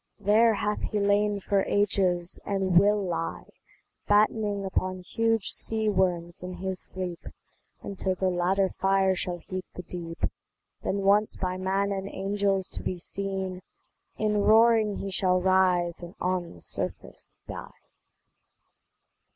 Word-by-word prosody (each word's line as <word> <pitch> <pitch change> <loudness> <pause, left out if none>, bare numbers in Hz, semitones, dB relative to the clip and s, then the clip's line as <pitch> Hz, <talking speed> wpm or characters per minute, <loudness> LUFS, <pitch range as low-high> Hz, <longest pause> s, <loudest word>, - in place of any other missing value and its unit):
There 215 +3 +4
hath 210 +1 -2
he 210 - -2
lain 205 0 +2
for 200 0 +1
ages, 185 -4 +1
and 190 -3 +3
will 205 +2 +3
lie 170 -2 -4 0.6
Battening 205 -1 +2
upon 185 -1 -2
huge 225 +2 0
sea 220 -1 +3
worms 175 -3 0
in 180 0 -6
his 190 +1 -4
sleep, 180 -2 -5 0.6
Until 190 -1 -2
the 185 0 0
latter 185 +2 +2
fire 195 0 +2
shall 180 -1 -3
heat 185 +2 -6
the 180 - -6
deep; 170 -1 -5 0.6
Then 200 0 -2
once 205 +2 +3
by 185 -1 -2
man 195 +2 0
and 195 0 -3
angels 195 -1 -1
to - - -5
be 185 - -3
seen, 190 0 -3 0.6
In 210 -1 +1
roaring 220 -1 +5
he 195 - -5
shall 185 -1 +2
rise 180 -2 +2
and 175 0 -9
on 180 -1 -2
the 85 - -15
surface - - -3
die. - - -7
190 Hz, 135 wpm, -27 LUFS, 180-205 Hz, 0.6 s, roaring